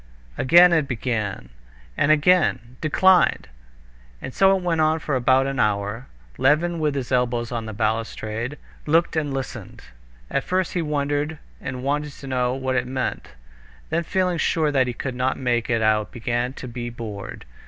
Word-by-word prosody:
Again 175 - +6
it 155 -4 +2
began, 110 - -3 0.5
and 145 - +2
again 155 -6 +2
"Declined." 180 - +3 0.7
And 130 - -7
so 195 0 +4
it 185 - -7
went 165 -2 +1
on 155 +1 +3
for 150 -3 -2
about 130 +1 +3
an 135 -1 -3
hour. 105 +4 -1 0.3
Levin, 165 +5 +2
with 150 -2 0
his 135 -2 -4
elbows 120 -2 0
on 115 -2 -3
the - - -5
balustrade, 110 +3 -2 0.3
looked 165 +3 +2
and 150 -3 -1
listened. 135 -1 -6 0.5
At 140 - 0
first 185 -1 -1
he 180 - 0
wondered 145 0 -1 0.2
and 130 -1 -5
wanted 145 +1 -1
to 140 - -12
know 125 -1 0
what 130 -1 -2
it 125 0 -1
meant; 130 - -4 0.6
then 170 - +1
feeling 180 0 0
sure 155 -2 +1
that 130 -3 +2
he 125 - -2
could 130 +2 -4
not 130 +1 -1
make 120 -2 -1
it 115 -2 +1
out 110 -1 +2
he - - -10
began 120 +1 -1
to 130 - -8
be 120 0 -5
bored. 110 -4 -8
130 Hz, 175 wpm, -23 LUFS, 120-155 Hz, 0.7 s, Again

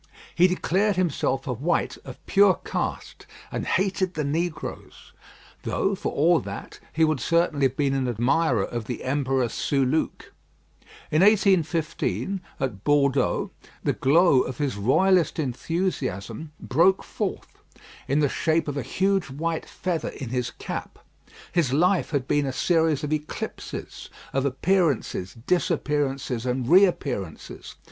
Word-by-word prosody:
He 175 +2 +5
declared 190 +3 +1
himself 145 -6 0
a 130 - -1
white 140 +9 0
of - - -11
pure 200 -1 +5
caste, - - -4 0.2
and - - -3
hated 190 -1 0
the 155 - -1
negroes; 160 +3 -4 0.5
though, - - 0
for - - -3
all - - +3
that, - - -8
he 160 - +1
would 155 -3 +2
certainly 165 -4 +2
have 130 +2 -11
been 140 -2 +1
an 135 -1 0
admirer 120 0 +1
of 120 -2 -5
the 120 +1 -5
Emperor 135 -2 0
Soulouque. 135 +5 -1 0.8
In 155 - +3
1815, 190 -2 +2 0.2
at 115 -8 -3
Bordeaux, 140 -9 +2 0.3
the - - +1
glow 145 -1 +4
of 130 - -4
his 140 -5 -1
royalist 175 - +3
enthusiasm 145 - -3
broke 175 +8 +3
forth - - -5 0.5
in 140 +3 +2
the 145 - +4
shape 160 +3 0
of 145 -1 -3
a - - 0
huge 190 +5 0
white 160 +4 -3
feather 175 -3 -3
in 130 - -7
his 125 0 -1
cap. - - -6 0.5
His 165 -8 +1
life 180 +6 +2
had 140 -4 -1
been 145 -1 +1
a - - -1
series 160 0 +1
of 150 +1 -1
eclipses 150 0 -6 0.2
of 135 0 0
appearances, 140 - 0
disappearances, 140 - 0
and 125 -1 -1
reappearances. 140 - +1
150 Hz, 135 wpm, -25 LUFS, 130-175 Hz, 0.8 s, He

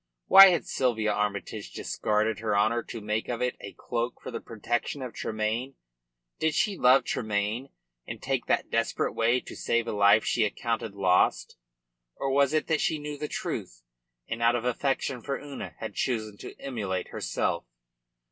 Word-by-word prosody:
Why 195 0 +11
had 180 -2 +2
Sylvia 110 -5 0
Armytage 105 0 -3
discarded 105 0 0
her 105 -2 0
honour 115 +3 +2
to 115 - -7
make 105 +1 -2
of 120 -2 -2
it 125 0 0
a 100 - -8
cloak 120 0 -3
for - - -8
the 115 - -4
protection 120 +5 -3
of 125 - -6
Tremayne? 110 +5 -2 0.6
Did 160 -1 +1
she 205 - +1
love 130 -4 +5
Tremayne 110 +4 -2 0.4
and - - -6
take - - -2
that - - 0
desperate - - 0
way 115 +2 +2
to - - -10
save 115 0 0
a - - -1
life 100 +1 +5
she 120 - +2
accounted 110 0 -2
lost, 95 -2 +2 0.6
or 135 - -2
was 140 0 +3
it 155 0 +1
that 160 -2 +1
she 160 - +1
knew 150 0 -5
the 150 - -3
truth, - - -5 0.4
and 115 +1 -4
out 115 +1 +4
of 120 0 -2
affection 130 0 -1
for 140 +2 -3
Una 145 -2 -8
had - - -6
chosen 110 -5 -2
to - - -10
immolate 100 -9 -3
herself? - - -2
115 Hz, 175 wpm, -28 LUFS, 105-135 Hz, 0.6 s, Why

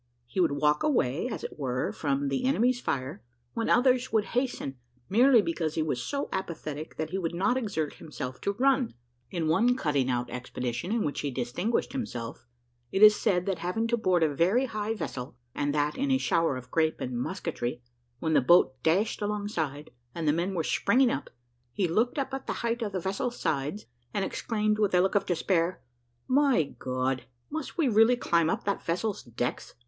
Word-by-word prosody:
He 120 +10 -5
would 170 -5 +3
walk 150 +1 +2
away, 175 - +1
as 245 - -5
it - - -7
were, 125 -2 -1
from 140 -1 -1
the 135 - -1
enemy's 250 -1 +2
fire, 130 - -3 0.3
when 230 - -1
others 255 0 +3
would 220 -2 +2
hasten, 240 - -2 0.3
merely 240 +2 +6
because 160 -3 -2
he 160 - +1
was 130 -6 -1
so 280 - -2
apathetic 155 -4 -5
that 155 0 -3
he 190 - -1
would 170 -2 -2
not 220 +8 +2
exert 200 - -2
himself 130 -4 -7
to 200 - 0
run. 260 +1 +2 0.3
In 170 -3 -2
one 225 +10 +3
cutting 145 - 0
out 125 -1 0
expedition 125 - -4
in 230 -1 +1
which 145 - -2
he 145 - -1
distinguished 135 - -1
himself, 120 - -5 0.4
it 195 - +3
is 210 0 +10
said, 180 -5 +1
that 190 -4 -1
having 180 +7 -1
to 235 - +3
board 185 -7 +2
a 155 -2 +2
very 190 - +3
high 215 -2 -2
vessel, 125 - -5 0.2
and 145 0 0
that 150 0 +1
in 280 +1 0
a 265 - +4
shower 165 - +1
of 125 0 -10
grape 160 -1 +1
and 125 -1 -4
musketry, 125 -7 -3 0.3
when 160 +4 -1
the 145 - +5
boat 130 -3 +4
dashed 190 - +1
alongside, 205 -9 -3 0.2
and 165 -2 -2
the 150 - +4
men 175 +4 -1
were 165 - 0
springing 240 +10 +3
up, 135 - -3 0.4
he 190 - +1
looked 225 - +1
up 270 -1 -2
at 270 0 -5
the - - -1
height 235 +1 0
of 215 -3 -2
the 190 - -2
vessel's 195 +7 -2
sides, 145 +8 -2 0.3
and 200 -2 +1
exclaimed 215 -1 -1
with 205 -3 +2
a - - +6
look 190 +2 +2
of 205 - +1
despair, 175 0 +1 0.5
"My 270 - +4 0.2
God! 130 0 -1 0.3
must 315 0 -5
we 320 -5 +3
really 225 +1 +5
climb 170 -8 +2
up - - -1
that 200 0 -1
vessel's 200 +5 -1
decks?" 120 +1 -4
180 Hz, 195 wpm, -28 LUFS, 145-225 Hz, 0.5 s, is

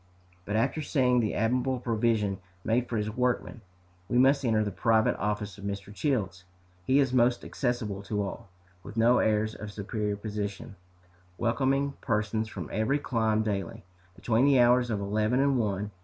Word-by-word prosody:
But 105 - -3
after 115 +8 +1
seeing 125 -4 +2
the 110 -3 0
admirable 125 +3 +1
provision 110 -4 0 0.2
made 120 +2 0
for 115 - -1
his 105 0 -2
workmen, 125 0 -1 0.5
we 120 - +1
must 135 +2 +4
enter 110 -3 +2
the 105 - -3
private 110 +3 +2
office 105 -1 -3
of - - -11
Mr. 100 0 -5
Childs. 100 - -1 0.4
He 130 - +4
is 135 -3 +2
most 120 -1 +2
accessible 115 -6 -2
to 105 0 -1
all, 100 - -6 0.3
with 105 - -10
no 120 +2 +4
airs 110 0 +1
of 105 -1 -8
superior 105 0 -3
position, 100 -1 -5 0.6
welcoming 135 +4 +1
persons 110 -1 -1
from 90 -7 -6
every 110 +7 +1
clime 110 -6 0
daily, 100 -5 -3 0.3
between 120 +6 +1
the 140 -2 +5
hours 120 0 +4
of 105 -3 -1
eleven 105 +5 0
and 135 -2 +2
one. 105 -1 -2
110 Hz, 165 wpm, -28 LUFS, 105-125 Hz, 0.6 s, the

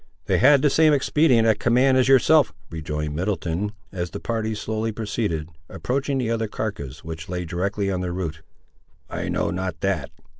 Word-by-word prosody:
"They - - +2
had 140 +2 +6
the 145 - +4
same 155 0 +5
expedient 135 -4 +3
at 110 -2 +3
command 125 +3 +3
as 130 0 +3
yourself," 135 - +5 0.2
rejoined 75 -2 -4
Middleton, 95 +2 -2 0.2
as 90 -2 -3
the - - -6
party 110 -1 -2
slowly 110 +1 -2
proceeded, 105 -7 -3 0.2
approaching 135 +2 -2
the 120 -3 -1
other 115 -1 0
carcass, 100 -12 -5
which 80 +1 -7
lay 90 -1 -3
directly 100 +4 -1
on 90 -1 -2
their 90 -1 -2
route. 80 -4 -4 0.7
"I - - -3
know - - 0
not 90 -2 -3
that. 100 0 -1
105 Hz, 175 wpm, -23 LUFS, 90-125 Hz, 0.7 s, had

